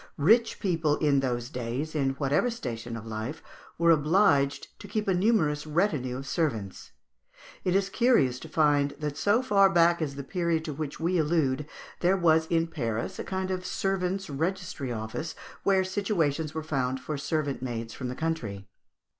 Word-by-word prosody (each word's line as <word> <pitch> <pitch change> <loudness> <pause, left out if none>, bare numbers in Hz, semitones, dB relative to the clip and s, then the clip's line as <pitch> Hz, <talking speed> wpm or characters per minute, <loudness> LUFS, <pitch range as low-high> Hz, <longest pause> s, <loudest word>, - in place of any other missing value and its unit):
Rich 225 +10 +3
people 165 -6 +1
in 145 -3 +3
those 125 -1 -2
days, 125 +5 -3
in 135 -3 0
whatever 140 - +1
station 120 - -5
of 115 - -9
life, 110 +6 -5 0.3
were 170 0 +4
obliged 150 -3 +3
to - - -9
keep 215 -1 -2
a 190 - +3
numerous 175 -7 +2
retinue 150 -7 0
of 135 - -7
servants. 115 - -2 0.7
It 180 0 +1
is 195 0 +2
curious 195 - +3
to 160 - -10
find 145 -2 +2
that 150 -1 -3
so 210 - +2
far 200 -5 +5
back 170 -1 +4
as 140 -3 -2
the 140 - -5
period 170 0 -1
to 150 - -3
which 145 0 -5
we 175 +2 +1
allude, 150 -3 +1 0.3
there 185 +2 +3
was 160 -2 +3
in 165 0 +2
Paris 115 - -3
a - - -2
kind 190 0 -3
of 185 -1 -2
servants' 195 0 -1
registry 160 -2 -3
office, 110 +8 -4 0.3
where 190 -1 +3
situations 170 -6 -1
were 160 - -3
found 130 -4 -1
for 140 +4 -4
servant 145 -1 -2
maids 115 -3 -4
from 130 - -5
the 125 - -4
country. 115 -12 -3
155 Hz, 170 wpm, -28 LUFS, 135-180 Hz, 0.7 s, far